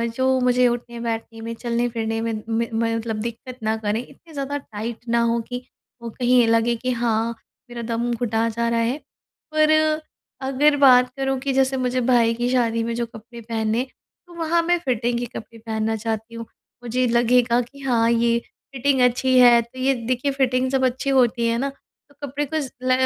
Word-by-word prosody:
जो 260 +1 +2
मुझे 250 0 +3
उठने-बैठने 235 -1 -4
में 230 +1 -5
चलने-फिरने 235 -1 -2
में 230 0 -2 0.2
में, 230 +1 0
म 230 0 0
मतलब 225 -1 -3
दिक्कत 235 +3 -7
ना 220 0 +1
करें। 215 0 -1
इतने 320 +4 -18
ज़्यादा 280 0 -3
टाइट 225 -3 -6
ना 235 0 +3
हों, 235 0 +1
कि 245 +2 -6 0.4
वो 235 - -5
कहीं 250 +2 +2
ये 235 - +4
लगे 230 +1 +3
कि 255 +2 -2
हाँ 230 -1 0 0.4
मेरा 240 -1 -6
दम 235 +1 -2
घुटा 230 -1 0
जा 235 +1 -1
रहा 235 0 +1
है, 235 +4 0 0.6
पर 310 0 +4 0.8
अगर 290 +3 +3
बात 250 -3 +6
करूँ 270 0 0
कि 270 +1 -2
जैसे 265 0 +2
मुझे 255 0 0
भाई 235 -2 +3
की 240 +1 -1
शादी 230 -2 +1
में 230 +1 -2
जो 235 0 -1
कपड़े 235 +1 -12
पहने, 225 +1 -1 0.4
तो 350 - -15
वहाँ 335 0 +1
मैं 350 +1 +2
फिटिंग 240 -5 -1
के 245 - -2
कपड़े 230 +1 -14
पहनना 220 0 -1
चाहती 220 +1 -4
हूँ। 230 0 -6 0.4
मुझे 245 +2 0
लगेगा 240 0 +3
कि 260 +4 -12
हाँ 235 -4 +2
ये 235 0 +2 0.4
फिटिंग 265 0 +1
अच्छी 250 +1 +3
है, 240 -1 +7
तो 235 +3 -12
ये 265 +1 +2
देखिए 255 +3 0
फिटिंग 260 -1 +1
जब 265 0 +2
अच्छी 260 +2 -1
होती 240 -3 +3
है 230 0 +1
ना, 275 +3 -1 0.4
तो 285 - -23
कपड़े 285 +2 -2
को 315 +3 -2
ज़ 275 -4 -4
ल 255 - +1
240 Hz, 195 wpm, -22 LUFS, 230-260 Hz, 0.8 s, है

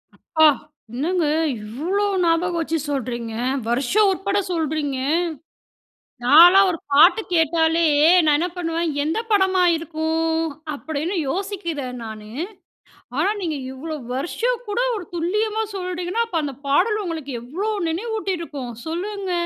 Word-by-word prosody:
அப்பா! 315 -2 +3 0.5
என்னங்க 330 +7 0 0.4
இவ்வளோ 320 - -2 0.2
ஞாபகம் 340 +1 +1
வச்சு 325 0 -1
சொல்றீங்க, 240 -4 -3 0.3
வருஷம் 275 - +2
உட்பட 390 +2 -1 0.2
சொல்றீங்க! 310 -4 -1 1.3
நான்லாம் 350 +9 +8
ஒரு 330 - -5
பாட்டு 335 +10 +6
கேட்டாலே, 325 0 +3 0.4
நான் 300 -1 +4
என்ன 355 +2 0
பண்ணுவேன் 330 -1 -1
எந்த 320 +8 -1
படமா 380 -2 +3
இருக்கும்? 320 0 -1 0.4
அப்டின்னு 315 +5 -3
யோசிக்கிறேன் 335 - -4
நானு. 215 -1 -9 0.9
ஆனா, 350 +6 +3
நீங்க 320 -4 -2 0.2
இவ்ளோ 310 +4 -6 0.2
வருஷம் 460 - -2
கூட 415 +3 -2 0.2
ஒரு 390 - -5
துல்லியமா 425 +6 0
சொல்றீங்கணா, 365 +4 -2
அப்போ 340 -6 -1
அந்த 280 -3 -4
பாடல் 420 +10 +2
உங்களுக்கு 315 -6 -5
எவ்ளோ 345 - -3 0.2
நினைவூட்டிருக்கும். 335 - -4
சொல்லுங்க. 380 +3 -4
330 Hz, 115 wpm, -22 LUFS, 295-380 Hz, 1.3 s, நான்லாம்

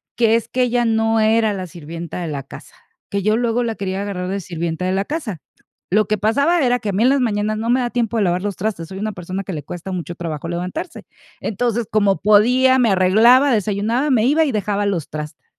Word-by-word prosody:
que, 230 -1 +3
es 230 - -1
que 255 0 0
ella 240 0 +1
no 225 0 +2
era 220 -1 +3
la 185 -2 -5
sirvienta 170 0 -7
de 170 - -3
la 140 -2 -4
casa, - - -13 0.4
que 200 0 -1
yo 215 +3 +2
luego 240 0 0
la 225 -1 -2
quería 195 -1 -3
agarrar 185 -3 -4
de 200 +1 -2
sirvienta 170 -1 -4
de 185 - 0
la 195 +1 0
casa. 265 - -4 0.5
Lo 210 +3 +3
que 215 - 0
pasaba 280 - +2
era 245 0 +2
que 215 - -4
a - - 0
mí 200 +4 +1
en - - +5
las 275 -1 +2
mañanas 215 -2 0
no 225 +2 -3
me 250 +2 +3
da 240 -1 -1
tiempo 235 -2 -1
de 210 - +2
lavar 180 0 +1
los 205 -3 -3
trastes, 185 -5 -3
soy 190 0 -7
una 215 0 -3
persona 185 +2 -5
que 190 - -5
le 150 -3 -5
cuesta 175 +5 -7
mucho 175 -1 -5
trabajo 165 -1 -5
levantarse. 180 - -5 0.3
Entonces, 235 +2 -1
como 200 -2 +2
podía, 250 +6 +4
me 235 -4 +3
arreglaba, 225 +9 +5
desayunaba, 220 +6 0
me 225 -3 +3
iba 305 +5 +3
y 285 - 0
dejaba 205 -1 -1
los 180 -7 -2
traste. 150 0 -7
210 Hz, 235 wpm, -19 LUFS, 185-235 Hz, 0.5 s, en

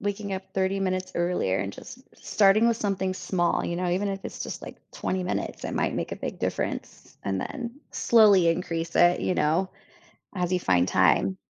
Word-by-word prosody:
waking 200 0 -3
up 190 0 -3
30 190 +1 0
minutes 185 -1 -2
earlier, 175 - 0
and 100 +1 -3
just 250 - -11 0.2
starting 215 +3 +4
with 230 - +2
something 190 -3 -1
small, 180 -1 0
you 170 - -2
know, 180 0 -1
even 190 +3 0
if 195 0 -5
it's - - -7
just, - - -6
like, - - -9 0.2
20 185 0 -2
minutes, 180 - -3
it - - -3
might - - 0
make - - -3
a - - -3
big - - -5
difference, - - -4
and 95 -1 -2
then, 240 +4 -6
slowly 205 -7 +5
increase 165 -1 -2
it, 175 0 +5
you 185 - 0
know, 165 +5 +1 0.7
as 180 -1 -1
you 185 - +2
find 90 - +2
time. 95 - +3
185 Hz, 195 wpm, -26 LUFS, 170-195 Hz, 0.7 s, slowly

